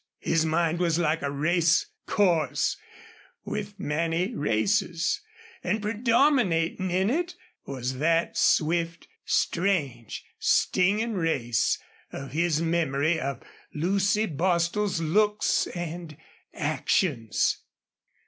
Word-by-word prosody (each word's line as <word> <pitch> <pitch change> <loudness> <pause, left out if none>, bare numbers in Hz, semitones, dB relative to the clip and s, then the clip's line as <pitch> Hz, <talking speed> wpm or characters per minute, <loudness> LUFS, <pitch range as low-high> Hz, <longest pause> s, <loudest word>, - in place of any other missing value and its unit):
His 165 -1 +1
mind 165 +1 +1
was 170 -2 +1
like 165 -1 +1
a 140 - -1
racecourse 165 +3 +1 0.7
with 205 -1 -5
many 165 +7 -1
races; 165 - 0 0.4
and 215 - 0
predominating 215 - +2
in 190 +4 +1
it 345 +5 -1 0.3
was 130 -1 -4
that 165 +2 +1
swift, 165 +1 +1 0.2
strange, 145 - -1
stinging 210 +5 +2
race 135 - +1 0.3
of 135 -1 -7
his 165 +1 +1
memory 160 -1 +1
of 135 -3 -4 0.3
Lucy 200 +6 +1
Bostil's 175 +3 0
looks 210 +6 +2
and 170 -3 -6 0.3
actions. 145 - 0
170 Hz, 90 wpm, -26 LUFS, 155-195 Hz, 0.7 s, predominating